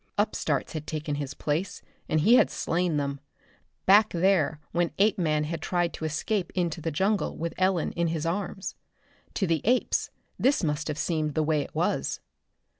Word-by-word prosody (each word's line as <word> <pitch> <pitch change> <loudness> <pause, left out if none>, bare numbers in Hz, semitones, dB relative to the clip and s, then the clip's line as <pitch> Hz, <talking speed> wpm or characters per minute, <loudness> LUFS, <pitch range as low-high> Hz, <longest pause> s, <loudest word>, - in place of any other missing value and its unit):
Upstarts - - 0
had 155 -2 -5
taken 155 -1 -3
his 145 -1 -4
place, 160 +6 -2 0.3
and 155 - +2
he 220 +9 +5
had 250 - +6
slain 170 -2 0
them 140 -1 -2 0.7
back 210 +3 +6
there 175 -4 +2
when 170 -1 +1
Apeman 175 -7 +2
had 160 +1 -4
tried 175 -1 0
to 160 - -5
escape 175 +5 -1
into 170 -2 -1
the 165 - -1
jungle 195 +7 0
with 165 +1 -3
Ellen 185 -2 +1
in 170 0 0
his 160 -1 -2
arms. 190 +2 -3 0.6
To 195 - +1
the 165 -4 +1
apes 250 +3 +1 0.3
this 265 -5 +3
must 150 -1 -1
have 150 -1 -3
seemed 155 -3 -1
the 155 - +2
way 155 -1 +1
it - - -8
was. - - 0
165 Hz, 175 wpm, -27 LUFS, 155-190 Hz, 0.7 s, had